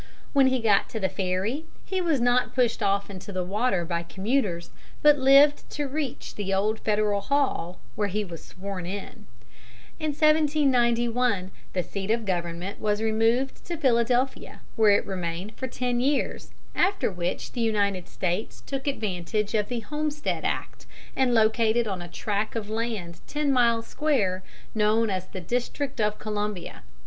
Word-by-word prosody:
When 275 -2 +6
he 260 0 +2
got 210 -3 +3
to 220 - -4
the 190 -2 +1
ferry 195 - -1 0.2
he 380 -1 -1
was 325 -6 +2
not 245 +1 +2
pushed 245 -3 +2
off 200 0 +1
into 190 +1 -8
the 185 -2 -1
water 195 -1 0
by 170 0 -1
commuters, 190 0 -1 0.3
but 295 -1 +6
lived 275 +2 +6
to 290 -1 -2
reach 275 -2 -4
the 200 -2 -3
Old 210 +3 +1
Federal 210 -1 +1
Hall, 230 -10 0 0.2
where 205 - 0
he 210 +2 -1
was 170 -3 -9
sworn 185 -1 -6
in. 205 +3 -7 0.7
In 310 - -2
1791 250 - +2 0.2
the 180 - 0
seat 195 +4 -5
of 225 0 +1
government 175 +1 -3
was 210 -1 +1
removed 225 +4 +1
to 345 - -4
Philadelphia, 250 -1 +1
where 220 -2 +5
it 200 - +4
remained 180 +2 -4
for 260 - -4
ten 245 0 -1
years, 275 +3 0 0.2
after 385 - +2
which 175 -1 -3
the 240 - -3
United 200 -5 +1
States 185 +4 -3
took 275 0 -4
advantage 210 -4 -1
of 210 -2 +1
the 240 -2 -3
Homestead 300 +4 -2
Act - - -3 0.3
and 260 -2 +2
located 225 0 +3
on 190 -3 -3
a 175 - -6
tract 205 +5 -2
of 215 -2 -3
land 215 -7 -3
ten 295 -1 0
miles 235 -2 +3
square, 220 -12 0 0.3
known 215 0 +2
as 185 -1 -3
the 185 - -7
District 245 - -2
of 210 0 +1
Columbia. 210 - -4
220 Hz, 160 wpm, -26 LUFS, 195-260 Hz, 0.7 s, When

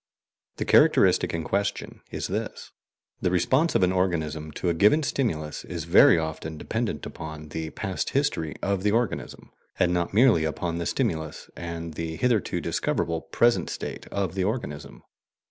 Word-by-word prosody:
The - - -2
characteristic - - +5
in 80 -1 -2
question 100 +3 -2
is - - -4
this: - - -4 0.5
The - - +2
response 130 - +2
of - - +4
an 90 - +3
organism 80 -4 -1
to 90 - -3
a - - +2
given 105 - +4
stimulus 80 - -2
is 85 -3 -5
very 90 - +6
often 80 0 -4
dependent - - -3
upon 80 -1 -8
the 80 +1 -4
past 95 +2 -3
history 80 - 0
of 100 -1 0
the 105 - +2
organism, 120 -2 -2 0.3
and 90 - +2
not 85 -1 0
merely 110 -6 +5
upon 85 +2 -2
the 85 - -2
stimulus 80 -1 -2
and 85 -1 -6
the 80 +1 -4
HITHERTO 120 0 +1
DISCOVERABLE 80 -1 -1
present 120 0 +3
state - - -6
of 100 -3 -2
the 95 -1 -1
organism. 100 - -4
85 Hz, 160 wpm, -26 LUFS, 80-100 Hz, 0.5 s, very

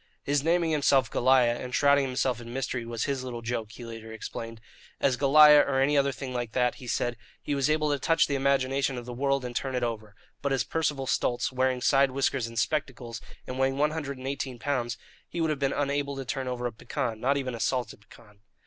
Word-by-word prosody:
His 145 -1 +1
naming 165 0 +2
himself 135 -5 +3
"Goliah" 125 -2 +3
and 125 0 -4
shrouding 140 -1 +4
himself 125 -1 -1
in 120 0 -9
mystery 125 -2 -3
was 115 -1 -3
his 140 -2 -2
little 120 -2 -6
joke, 115 -2 -3
he 120 - -10
later 115 -1 -9
explained. 115 +1 -7 0.4
As 130 - +2
Goliah, 150 +2 +7
or 135 -2 0
any 140 +2 +3
other 140 -1 +3
thing 130 +1 -6
like 120 -2 -3
that, 125 -1 +2
he 125 - -9
said, 120 0 -1 0.2
he 145 - -3
was 140 0 +1
able 155 -1 +2
to 145 - 0
touch 165 +4 +3
the 145 - -3
imagination 135 -1 +1
of 120 - -6
the 125 - -6
world 135 +1 0
and 120 -1 -6
turn 130 +1 -2
it 125 - -1
over; 110 -3 -4 0.3
but 140 - -1
as 135 - +1
Percival 150 -4 -1
Stultz, 120 -1 0
wearing 130 -1 0
side 135 +2 +4
whiskers 135 -2 0
and 115 0 -10
spectacles, 120 -5 -2 0.2
and 130 +1 -6
weighing 135 0 +1
one 150 +1 +2
hundred 145 -4 -4
and 130 +1 -7
eighteen 135 -2 -4
pounds, 120 -4 -2 0.3
he 175 - -5
would 160 -1 +1
have 150 - -2
been 135 -1 +1
unable 140 0 -1
to 135 -1 -5
turn 130 +1 -3
over 125 -1 -3
a 120 - -1
pecan 110 0 -4
"not 135 +4 +1
even 130 -2 -3
a 115 - -6
salted 125 -3 -2
pecan." 105 0 -19
130 Hz, 230 wpm, -28 LUFS, 120-140 Hz, 0.4 s, Goliah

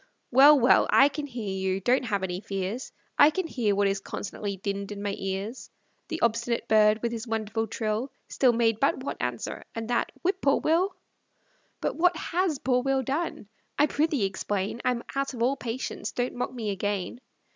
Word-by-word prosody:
Well, 280 +3 +8
well, 250 +1 +5
I 275 +1 +6
can 290 +1 -5
hear 225 -7 -4
you, 190 0 -1
don't 250 +6 +2
have 200 -4 -1
any 180 -1 -2
fears, 195 +5 -4 0.3
I 290 - +9
can 370 +4 -2
hear 230 -10 0
what 200 0 +3
is 195 0 0
constantly 200 0 -5
dinned 200 +1 -4
in 205 0 -6
my 200 -1 -1
ears. 195 +5 -4 0.4
The 325 - -4
obstinate 235 +1 0
bird, 215 0 +4
with 235 - 0
his 230 0 -5
wonderful 225 0 -2
trill, 220 +4 -2 0.2
Still 255 -2 +3
made 225 -2 +2
but 270 0 +1
one - - -4
answer, 125 -2 -3
and 225 -1 -4
that, 240 - +1
"Whip 375 +1 0
poor 275 0 +3
Will." 360 +4 +1 0.9
But - - -2
what 345 0 +3
HAS 345 -1 0
poor 250 -1 +1
Will 270 0 +1
done? 280 -4 -3 0.3
I 295 - +5
prithee 300 - +1
explain; 195 +3 -2
I'm 245 -1 0
out 275 -1 -1
of 230 - -1
all 265 +3 +2
patience, 245 0 -4
don't 245 0 -2
mock 245 - -3
me 225 -5 -3
again. 200 +3 -3
235 Hz, 190 wpm, -27 LUFS, 205-270 Hz, 0.9 s, I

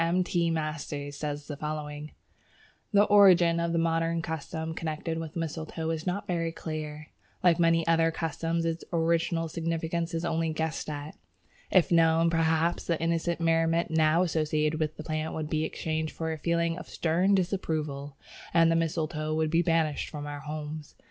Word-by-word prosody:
M. 175 +2 +2
T. 170 -1 +1
Masters 150 -3 -3
says 145 0 -4
as 145 - -7
follows: 150 0 -4 0.8
"The 205 -1 +6
origin 185 -5 +6
of 170 0 0
the 170 - 0
modern 165 0 +1
custom 160 0 -4
connected 160 0 -3
with 160 -1 -6
mistletoe 160 0 -3
is 160 +2 -4
not 200 +4 -1
very 170 -3 -1
clear. 155 -2 -6 0.3
Like 175 -2 +5
many 165 -1 +3
other 165 0 +3
customs, 165 +1 -2
its 165 0 -2
original 165 0 +1
significance 165 +1 -2
is 165 +1 -2
only 165 -1 0
guessed 160 0 -2
at. 145 +1 -6 0.5
If 185 -2 +4
known, 165 0 +4
perhaps, 165 +1 +1
the 170 -2 +1
innocent 165 +1 0
merriment 165 0 +2
now 160 +2 +4
associated 155 -2 0
with 155 0 -2
the 155 - -6
plant 155 0 -3
would 155 -1 -4
be 155 0 +1
exchanged 160 -1 -3
for 160 0 -2
a 160 - -7
feeling 170 +1 0
of - - -10
stern 180 +5 +2
disapproval, 155 -7 -2 0.4
and 165 0 +6
the - - +3
mistletoe 155 -1 -1
would 155 -1 0
be 165 +1 +4
banished 165 -3 +1
from 145 -2 -6
our 145 0 -5
homes. 150 0 -6
165 Hz, 170 wpm, -28 LUFS, 155-170 Hz, 0.8 s, The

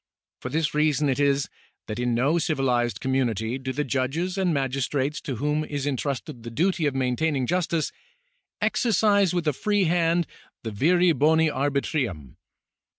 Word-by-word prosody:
For 130 - -5
this 155 +3 0
reason 150 -1 +2
it 135 - 0
is, 140 -1 +2 0.4
that 105 +2 -5
in 125 -1 0
no 140 +8 +2
civilised 130 -7 0
community 125 -2 -1
do 130 0 -4
the 145 +3 -1
judges 140 +7 -1
and 190 -3 +1
magistrates 135 +1 -1
to 135 - -4
whom 150 +5 0
is 145 -2 -4
entrusted 135 -3 -3
the 115 - -7
duty 170 +6 +1
of 140 - -2
maintaining 135 +2 0
justice, 170 0 0 0.7
exer 235 -3 +1
cise 200 -3 +3
with 175 -3 -1
a 150 - +3
free 205 +7 +1
hand 170 0 +2 0.4
the 110 - -4
viri 175 - +3
boni 160 +1 +3
arbitrium. 135 - -2
145 Hz, 155 wpm, -25 LUFS, 130-165 Hz, 0.7 s, cise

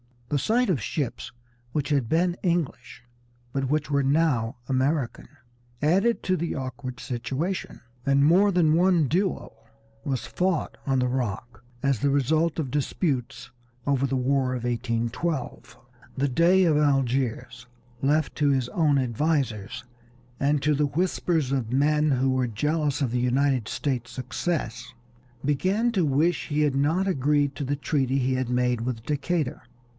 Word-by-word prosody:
The 145 - +1
sight 240 - +1
of 150 -11 +1
ships 135 +4 -3 0.4
which 150 -2 -1
had 140 -5 +1
been 175 +2 +2
English, 165 -10 -2 0.5
but 135 0 -2
which 150 0 0
were 140 0 +3
now 135 -4 +1
American, 135 0 0 0.5
added 195 +10 +2
to 185 -1 +1
the 170 0 -2
awkward 130 -1 -6
situation, 140 +8 -3 0.2
and 140 0 +4
more 190 +6 +5
than 170 -4 +3
one 175 -2 +3
duel 185 +2 -1 0.5
was 135 -3 -2
fought 180 -3 -1
on 135 -1 +2
the 125 - +1
Rock 120 -2 -3 0.2
as 140 -4 +1
the 140 - +1
result 155 +4 +1
of 145 -6 -2
disputes 140 -2 -2 0.3
over 140 -1 +1
the 135 - -1
War 130 0 +1
of 120 - -5
1812. 120 +3 -3 0.4
The 140 +1 +1
Dey 175 +8 +4
of 160 -4 +3
Algiers, 130 -4 0 0.3
left 150 +2 +1
to 145 -2 +3
his 130 -3 +1
own 150 -3 +2
advisers 130 -4 -1 0.6
and 140 0 +1
to 150 +1 +3
the 145 0 +1
whispers 165 -3 0
of 125 -4 -1
men 150 +2 +3
who 135 -1 +2
were 130 -1 +1
jealous 150 +5 -1
of 130 -4 0
the 125 - 0
United 125 -1 +1
States' 125 -4 -2
success, 130 0 -3 0.5
began 190 - +1
to 190 -7 +1
wish 155 +5 +1
he 150 -1 0
had 145 -2 +2
not 155 +7 +2
agreed 145 -4 +1
to 145 - -4
the 145 +2 0
treaty 135 -2 0
he 130 0 +1
had 130 -1 -2
made 125 -1 +1
with 115 -2 -3
Decatur. 150 -1 -2
140 Hz, 150 wpm, -26 LUFS, 130-160 Hz, 0.6 s, more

